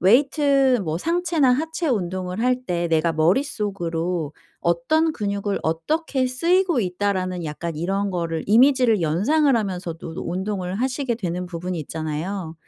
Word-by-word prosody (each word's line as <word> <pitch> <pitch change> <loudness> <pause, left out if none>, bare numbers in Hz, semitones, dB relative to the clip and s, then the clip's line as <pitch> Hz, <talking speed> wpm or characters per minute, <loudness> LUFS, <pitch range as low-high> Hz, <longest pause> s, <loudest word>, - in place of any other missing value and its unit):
웨이트 270 - +4
뭐 160 0 -2
상체나 335 - +2
하체 320 +5 -1
운동을 185 -4 -2
할때 245 -9 0
내가 165 +1 +2
머릿속으로 175 - 0 0.3
'어떤 310 - +2
근육을 200 -2 -2
어떻게 260 - 0
쓰이고 340 +3 +2
있다.'라는 185 -2 -1
약간 160 +2 -4
이런 195 +5 -1
거를 165 -3 -2
이미지를 245 -1 +5
연상을 250 - +2
하면서도 180 -6 -3 0.2
운동을 190 0 -3
하시게 255 +2 -1
되는 180 -4 -3
부분이 175 0 -4
있잖아요. 160 +4 -4
195 Hz, 320 characters per minute, -23 LUFS, 170-260 Hz, 0.3 s, 이미지를